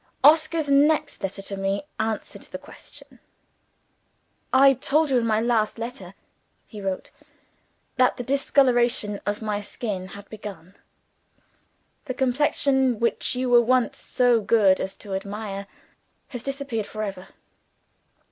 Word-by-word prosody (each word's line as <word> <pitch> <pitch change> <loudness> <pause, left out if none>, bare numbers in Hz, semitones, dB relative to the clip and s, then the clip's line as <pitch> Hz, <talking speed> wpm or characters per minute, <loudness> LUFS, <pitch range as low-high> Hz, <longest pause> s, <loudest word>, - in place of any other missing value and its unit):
Oscar's 315 +1 +4
next 295 +2 +3
letter 195 0 -4
to 195 - -5
me 195 +4 -1 0.2
answered 220 -1 -3
the - - -8
question. - - -15 1.3
"I 270 +1 +7
told 290 +4 +1
you 255 - +4
in 230 - -1
my 215 -1 +2
last" 225 -1 +1 0.9
(he 210 -3 -10
wrote), 190 -1 -4 0.9
"that 255 -1 +3
the 245 - -4
discoloration 245 -5 +2
of 205 +2 -2
my 210 -1 -2
skin 200 -3 -5
had 200 +1 -11
begun. 195 -4 -10 1.3
The 255 - -4
complexion 265 -1 +2
which 235 +2 0
you 255 +1 -1
were 240 0 +7
once 250 0 +1
so 245 -2 +2
good 200 -3 +4
as 190 - -3
to 200 -2 -7
admire, 200 0 -5 0.6
has 245 -4 -6
disappeared 270 -5 -4
for 215 0 -5
ever. 190 -2 -6
230 Hz, 130 wpm, -24 LUFS, 205-265 Hz, 1.3 s, I